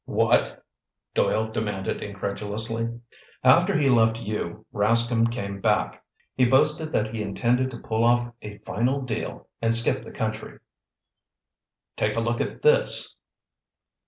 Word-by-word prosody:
"What?" -, -, +1 dB, 0.5 s
Doyle 110 Hz, +1 st, 0 dB
demanded 105 Hz, -3 st, -3 dB
incredulously. 105 Hz, +4 st, -3 dB, 0.4 s
"After 175 Hz, +9 st, +5 dB
he 145 Hz, -, +2 dB
left 115 Hz, -3 st, +3 dB
you, 105 Hz, -6 st, -5 dB
Rascomb 115 Hz, +2 st, +3 dB
came 100 Hz, -4 st, -5 dB
back. -, -, 0 dB, 0.3 s
He 130 Hz, -, +1 dB
boasted 150 Hz, +5 st, +3 dB
that 110 Hz, +1 st, 0 dB
he 110 Hz, -, -3 dB
intended 120 Hz, +5 st, 0 dB
to 125 Hz, -, -8 dB
pull 110 Hz, 0 st, -2 dB
off 120 Hz, 0 st, +2 dB
a 105 Hz, -1 st, -9 dB
final 130 Hz, +5 st, -1 dB
deal 125 Hz, -, -5 dB
and 115 Hz, 0 st, +4 dB
skip 115 Hz, -, +3 dB
the -, -, -11 dB
country. -, -, -5 dB, 1.4 s
Take 105 Hz, 0 st, 0 dB
a -, -, 0 dB
look 120 Hz, +1 st, -1 dB
at -, -, -5 dB
this!" -, -, +3 dB
115 Hz, 130 wpm, -25 LUFS, 105-125 Hz, 1.4 s, After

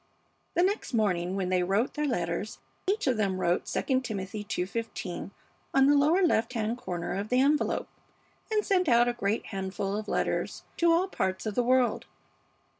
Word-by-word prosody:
The 350 Hz, -, +4 dB
next 385 Hz, -, 0 dB
morning 185 Hz, -4 st, +1 dB
when 190 Hz, -2 st, -1 dB
they 185 Hz, -1 st, +2 dB
wrote 195 Hz, +7 st, +1 dB
their 300 Hz, 0 st, -1 dB
letters 250 Hz, -, -2 dB, 0.3 s
each 410 Hz, +3 st, +1 dB
of 255 Hz, -4 st, +2 dB
them 195 Hz, -3 st, 0 dB
wrote 175 Hz, -1 st, 0 dB
'II 260 Hz, -2 st, +1 dB
Timothy 210 Hz, -4 st, -4 dB
ii:15' 205 Hz, -2 st, -4 dB, 0.5 s
on 270 Hz, 0 st, +6 dB
the 290 Hz, +1 st, +5 dB
lower 310 Hz, +7 st, +4 dB
left 250 Hz, -7 st, +1 dB
hand 225 Hz, +1 st, -1 dB
corner 175 Hz, -7 st, -4 dB
of 200 Hz, +2 st, -3 dB
the 250 Hz, -, +3 dB
envelope, 290 Hz, +3 st, +2 dB, 0.6 s
and 425 Hz, -1 st, +1 dB
sent 365 Hz, -5 st, +2 dB
out 240 Hz, 0 st, +5 dB
a 245 Hz, -, +1 dB
great 215 Hz, -1 st, -1 dB
handful 195 Hz, 0 st, -3 dB
of 215 Hz, 0 st, -4 dB
letters -, -, -1 dB
to 340 Hz, 0 st, +4 dB
all 345 Hz, +3 st, +3 dB
parts 190 Hz, -, -2 dB
of 215 Hz, -, -2 dB
the 245 Hz, -, +2 dB
world. 250 Hz, 0 st, +2 dB
230 Hz, 180 wpm, -28 LUFS, 195-275 Hz, 0.6 s, on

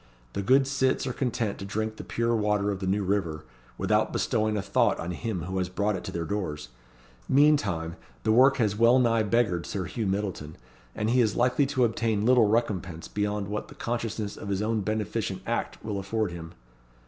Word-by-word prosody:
The -, -, -2 dB
good 135 Hz, +7 st, +4 dB
cits 130 Hz, -1 st, +1 dB
are 130 Hz, -, -2 dB
content 120 Hz, -5 st, -2 dB
to -, -, -6 dB
drink 110 Hz, +2 st, -3 dB
the -, -, -7 dB
pure 115 Hz, 0 st, 0 dB
water 105 Hz, -2 st, +1 dB
of 100 Hz, -, -4 dB
the 95 Hz, -, -3 dB
New 100 Hz, +2 st, +1 dB
River, 90 Hz, -6 st, -1 dB, 0.3 s
without -, -, +1 dB
bestowing 110 Hz, 0 st, 0 dB
a -, -, 0 dB
thought -, -, +2 dB
on 85 Hz, -, -3 dB
him 95 Hz, -1 st, -3 dB
who 95 Hz, +2 st, -3 dB
has 90 Hz, -1 st, -1 dB
brought 100 Hz, +3 st, 0 dB
it -, -, -5 dB
to -, -, -5 dB
their 85 Hz, -1 st, -3 dB
doors. 75 Hz, -8 st, -3 dB, 0.6 s
Meantime, 105 Hz, -, +3 dB, 0.3 s
the -, -, +2 dB
work 130 Hz, +4 st, +6 dB
has 105 Hz, -5 st, +1 dB
well 115 Hz, +3 st, +5 dB
nigh 115 Hz, -3 st, +3 dB
beggared 105 Hz, -6 st, +1 dB
Sir 95 Hz, -3 st, -3 dB
Hugh 110 Hz, +2 st, -3 dB
Myddleton, 95 Hz, -6 st, -3 dB, 0.4 s
and 110 Hz, +2 st, 0 dB
he 125 Hz, +1 st, +4 dB
is 110 Hz, -3 st, +1 dB
likely 125 Hz, +3 st, +2 dB
to 130 Hz, -2 st, +1 dB
obtain 110 Hz, -2 st, 0 dB
little 125 Hz, -3 st, +5 dB
recompense 100 Hz, -7 st, -1 dB
beyond 105 Hz, -1 st, -2 dB
what 105 Hz, +1 st, -4 dB
the -, -, -13 dB
consciousness 115 Hz, -3 st, -3 dB
of 100 Hz, -, -7 dB
his 100 Hz, +1 st, 0 dB
own 110 Hz, 0 st, 0 dB
beneficent 105 Hz, -2 st, -2 dB
act 115 Hz, +1 st, -2 dB
will 105 Hz, -2 st, -2 dB
afford 105 Hz, +1 st, -1 dB
him." 85 Hz, -1 st, -8 dB
105 Hz, 200 wpm, -27 LUFS, 95-115 Hz, 0.6 s, work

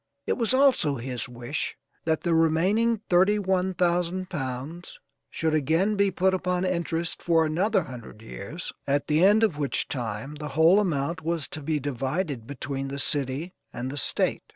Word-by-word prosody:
It -, -, +1 dB
was 230 Hz, -3 st, 0 dB
also 260 Hz, -, +4 dB
his 125 Hz, -1 st, -4 dB
wish 120 Hz, +4 st, -4 dB, 0.3 s
that 160 Hz, -1 st, +1 dB
the 170 Hz, -, +1 dB
remaining 190 Hz, +8 st, +2 dB
thirty 190 Hz, +4 st, +4 dB
one 190 Hz, -2 st, 0 dB
thousand 180 Hz, +1 st, 0 dB
pounds 140 Hz, +3 st, -5 dB, 0.3 s
should 160 Hz, -1 st, -1 dB
again 160 Hz, +8 st, +2 dB
be 200 Hz, 0 st, +3 dB
put 190 Hz, 0 st, +1 dB
upon 180 Hz, 0 st, 0 dB
interest 170 Hz, -2 st, -1 dB
for 165 Hz, -2 st, +3 dB
another 185 Hz, +5 st, +1 dB
hundred 120 Hz, -6 st, -10 dB
years, 115 Hz, -, -7 dB
at 140 Hz, 0 st, +1 dB
the 155 Hz, +3 st, +2 dB
end 210 Hz, +3 st, +6 dB
of 170 Hz, -9 st, +1 dB
which 140 Hz, -4 st, -1 dB
time 120 Hz, +1 st, -4 dB
the 150 Hz, 0 st, -6 dB
whole 165 Hz, +5 st, +6 dB
amount 165 Hz, -4 st, -1 dB
was 165 Hz, -3 st, -1 dB
to 155 Hz, -, -6 dB
be 150 Hz, +1 st, -1 dB
divided 135 Hz, -1 st, -3 dB
between 135 Hz, 0 st, -4 dB
the 140 Hz, +1 st, -5 dB
city 140 Hz, +5 st, -1 dB, 0.2 s
and 125 Hz, +2 st, -4 dB
the -, -, -6 dB
State. -, -, 0 dB
160 Hz, 170 wpm, -26 LUFS, 140-185 Hz, 0.3 s, end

